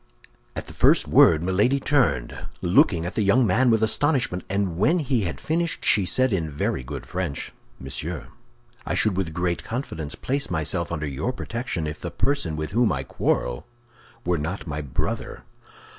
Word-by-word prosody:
At - - -4
the - - -11
first - - +4
word 80 0 +6
Milady 105 +10 +2
turned, 130 - 0 0.2
looking 85 -1 +4
at 90 - -4
the - - 0
young 110 +5 +4
man 120 +6 +3
with 110 -1 +3
astonishment; 120 - +1
and 95 -3 -1
when 160 - +4
he 130 - 0
had 85 - -4
finished, 170 +1 -1
she 100 -4 +4
said 130 +1 +2
in 80 -5 -1
very 70 -3 -2
good 70 +1 -7
French, 90 -5 -4 0.3
"Monsieur, 65 0 -5 0.5
I - - -2
should 110 -4 +2
with 90 -4 -1
great 90 +1 -1
confidence 80 - -5
place 140 +2 -2
myself 85 +1 0
under 80 -2 -2
your 75 - -2
protection 115 -9 -4
if 75 0 -5
the 85 - -4
person 90 - -1
with 75 0 -4
whom 115 +2 +3
I 65 - -2
quarrel - - -1 0.6
were 90 -2 +1
not 80 +7 -4
my 75 -2 -4
brother." 70 -4 -4
90 Hz, 175 wpm, -24 LUFS, 80-120 Hz, 0.6 s, word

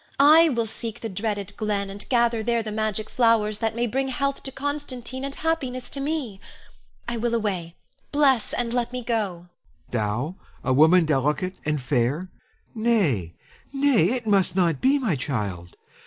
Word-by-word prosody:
I 315 +4 +7
will 235 -5 0
seek 225 0 -7
the 225 - -4
dreaded 205 0 -3
glen 205 -3 -1
and 200 +1 -8
gather 235 -2 +2
there 235 +1 0
the 215 - -5
magic 215 0 -1
flowers 220 -3 +2
that 225 0 -1
may 240 +1 +1
bring 265 +4 -1
health 275 +1 -1
to 270 - -6
Constantine 270 -2 -4
and 275 0 -4
happiness 265 -6 -2
to 280 - -4
me. 275 -8 -3 0.7
I 235 0 -2
will 235 +1 0
away; 185 -7 -2 0.4
bless, 275 -6 +3
and 240 -1 -2
let 245 -1 0
me 250 -1 -4
go. 230 -2 +1
Helon. 175 -3 -8 0.4
Thou, 120 - -1 0.3
a 130 - +1
woman 160 +5 +6
delicate 150 +5 0
and 150 0 0
fair! 135 +6 0 0.4
Nay, 190 - +1 0.4
nay, 275 - +3
it 245 -3 -3
must 200 -4 +2
not 170 -6 +2
be, 270 +2 +4
my 235 - 0
child! 100 - -4
220 Hz, 170 wpm, -24 LUFS, 180-250 Hz, 0.7 s, I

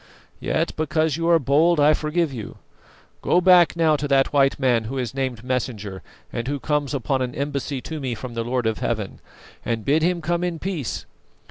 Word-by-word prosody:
Yet - - -1
because 155 -1 +1
you 165 +1 -1
are 170 - +6
bold, 155 +4 +3
I 150 +1 +6
forgive 155 0 -1
you. 110 -5 -7 0.6
Go 175 - +3
back 180 -2 +5
now 160 -2 +3
to 145 - -3
that 135 0 +2
white 135 -1 +3
man 120 -4 +2
who 135 +5 -4
is 125 -2 -3
named 130 -4 -3
Messenger 115 -7 -3 0.3
and 120 +1 -3
who 145 0 -2
comes 150 -1 -1
upon 130 +1 -1
an 125 -1 -3
embassy 140 -1 -3
to 160 +3 -6
me 130 -4 -3
from 120 +2 -7
the 115 0 -2
Lord 125 0 -1
of 110 -1 0
Heaven, 110 -4 -3 0.4
and 115 -2 -2
bid 150 +3 +3
him 175 +2 +1
come 170 +2 -1
in 175 -2 -2
peace. 165 -7 -4
140 Hz, 200 wpm, -23 LUFS, 125-160 Hz, 0.6 s, are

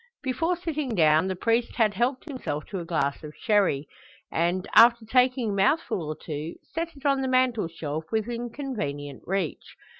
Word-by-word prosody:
Before 325 +7 0
sitting 305 -8 -3
down 160 0 +4
the 190 - -2
priest 230 +5 0
had 220 -4 +3
helped 245 +6 0
himself 255 - -4
to 195 - -3
a 170 - -6
glass 150 -3 -1
of 150 0 -9
sherry; 195 -10 +1 0.4
and, 175 +3 0
after 235 0 +7
taking 250 -1 +2
a - - -2
mouthful 200 - +1
or 155 0 -5
two, 155 +1 -5 0.2
set 335 0 -3
it 275 - -15
on 275 -1 +3
the 265 - -1
mantelshelf, 170 - 0
within 235 +2 -2
convenient 145 - -5
reach. 190 -4 -3
220 Hz, 170 wpm, -26 LUFS, 165-255 Hz, 0.4 s, after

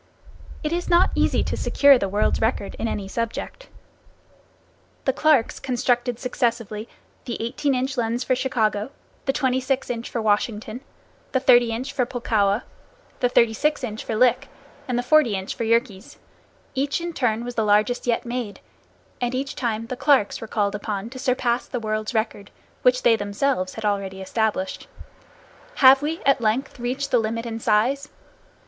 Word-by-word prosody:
It 305 +1 -1
is 350 +1 -2
not 350 +1 +4
easy - - +2
to - - -2
secure 280 -2 +5
the 195 - -1
world's 205 +2 +1
record 220 -3 -1
in 230 - -1
any 200 -3 -3
subject. 230 - -4 1.4
The 265 - +2
Clarks 290 -4 +2
constructed 245 -1 0
successively, 230 -4 -2 0.4
the 240 - -4
18 260 +4 -1
inch 260 +2 -2
lens 235 +1 0
for 255 - +1
Chicago, 220 -4 0 0.4
the 270 - +2
26 260 -1 0
inch 235 -1 -5
for 235 - -3
Washington, 215 +2 -1 0.5
the 260 - +3
30 245 -3 +5
inch 255 +5 -4
for 250 -3 0
Pulkowa, 220 -4 0 0.6
the 245 - +2
36 245 +6 +2
inch 220 -3 -4
for 225 - -3
Lick 245 +1 +3 0.4
and 250 -2 -1
the 245 - 0
40 250 -4 +4
inch 190 0 -4
for 230 - -3
Yerkes. 230 -3 -1 0.6
Each 275 +3 0
in 340 0 -4
turn 235 -5 0
was 245 - -5
the 225 -1 0
largest 215 +4 +2
yet 235 0 +1
made, 235 -4 -4 0.6
and 245 +1 -1
each 270 +1 -3
time 230 -3 -2
the 255 - -5
Clarks 270 -5 +2
were 225 - -6
called 205 -2 0
upon 210 +1 -4
to 260 - -8
surpass 250 -2 0
the 245 - -3
world's 215 +1 -3
record, 215 -2 -2 0.3
which 250 0 +3
they 230 - +5
themselves 205 -1 -1
had 220 - -5
already 195 -2 -1
established. 220 +8 -2 0.9
Have 265 0 +7
we 315 +3 -3
at 275 -2 +3
length 240 +5 -1
reached 265 +4 -3
the 245 - +4
limit 230 +1 -2
in 225 -1 -4
size? 245 +7 +1
240 Hz, 165 wpm, -23 LUFS, 220-260 Hz, 1.4 s, Have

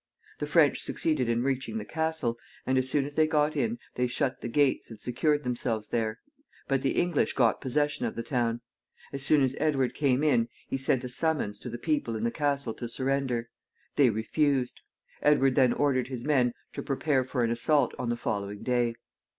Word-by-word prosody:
The 150 - -2
French 150 -2 +4
succeeded 145 -7 0
in 120 +1 +1
reaching 135 - -1
the 220 - -4
castle, 160 -7 -1 0.3
and, 130 - +1
as 130 0 -1
soon 140 0 +1
as 145 - -7
they 155 +1 +3
got 155 -1 +2
in, 230 +1 0 0.2
they 125 0 0
shut 125 +1 -1
the - - -4
gates 140 +2 +1
and 115 -2 -10
secured 145 +4 0
themselves 120 -3 -2
there, 110 -1 -1 0.5
but 135 -1 +1
the 135 - +1
English 175 -3 +1
got 120 -5 +2
possession 145 -1 0
of - - -5
the 115 - -3
town. 120 -3 -1 0.5
As 140 - -4
soon 140 +1 +4
as 130 0 +1
Edward 135 -5 +1
came 140 -1 +1
in, 120 -6 +3 0.2
he - - -2
sent 130 -1 +1
a 125 - -4
summons 140 -6 -1
to 125 - -7
the 120 - -5
people 145 -6 -1
in 110 - -3
the 115 - +1
castle 140 -5 -1
to 120 0 -6
surrender. 130 -2 -1 0.4
They 140 -4 +5
refused. 125 +4 0 0.4
Edward 135 -3 +4
then 130 -2 +4
ordered 130 -2 +1
his 125 -2 -6
men 125 -5 +2 0.2
to - - -4
prepare 140 -1 +1
for 125 -1 -1
an 115 - +1
assault 130 +2 +2
on 125 -2 -2
the 120 - 0
following 100 -2 -3
day. 120 -2 +1
130 Hz, 200 wpm, -28 LUFS, 120-145 Hz, 0.5 s, They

